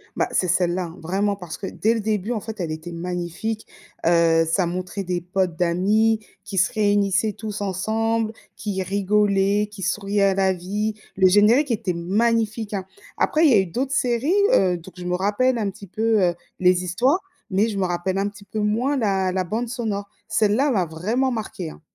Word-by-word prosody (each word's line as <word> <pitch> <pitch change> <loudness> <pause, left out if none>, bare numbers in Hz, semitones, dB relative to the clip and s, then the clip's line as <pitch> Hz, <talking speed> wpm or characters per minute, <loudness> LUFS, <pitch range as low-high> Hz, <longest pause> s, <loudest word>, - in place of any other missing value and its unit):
Bah, - - +1
c'est 185 - +1
celle-là 180 +1 +1
hein, 165 0 -9
vraiment, 195 +5 0
parce 180 -5 -8
que 195 - -6
dès 220 +4 0
le 225 - -1
début 215 +1 -1
en 220 - -1
fait 220 0 -8
elle 170 - -2
était 160 +2 -6
magnifique, 180 +5 -4 0.4
heu, 165 -1 +4
ça 170 +2 +1
montrait 185 +3 -4
des 175 -1 -2
potes 180 -1 -1
d'amis 205 +6 +2 0.2
qui 200 -3 -2
se 180 - +3
réunissaient 205 -1 +2
tous 210 -1 -6
ensemble, 220 +3 0 0.2
qui 190 -3 -3
rigolaient, 200 +1 +2
qui 205 -2 -10
souriaient 200 +1 0
à 195 -1 +4
la 190 -1 +2
vie, 205 +5 -2 0.2
le 190 -1 +5
générique 225 +8 +4
était 195 -5 -1
magnifique, 215 +4 0
hein. 190 -2 -3 0.3
Après 315 +2 +2
il 300 - +6
y 230 - +6
a - - +6
eu 190 - +2
d'autres 255 +10 -3
séries, 250 +5 +1 0.2
heu, 180 -2 +3
donc 170 +2 -13
je 180 - -7
me 180 0 0
rappelle 210 +7 +1
un 205 -3 -1
petit 200 +1 -12
peu, 220 +2 +1
heu, 175 -1 +2 0.2
les 180 0 +3
histoires, 245 - +2 0.3
mais 200 +3 +2
je 205 -3 -3
me 190 - +2
rappelle 180 +2 -1
un 200 +1 0
petit 205 0 -15
peu 215 +2 -5
moins 230 +7 +1
la 195 -5 +1
la 185 0 0
bande 220 +7 -2
sonore. 220 -4 -3 0.2
Celle-là 225 +7 +2
m'a 200 -9 +2
vraiment 215 +12 -1
marquée, 200 -7 -4
hein. - - -15
200 Hz, 200 wpm, -23 LUFS, 180-220 Hz, 0.4 s, il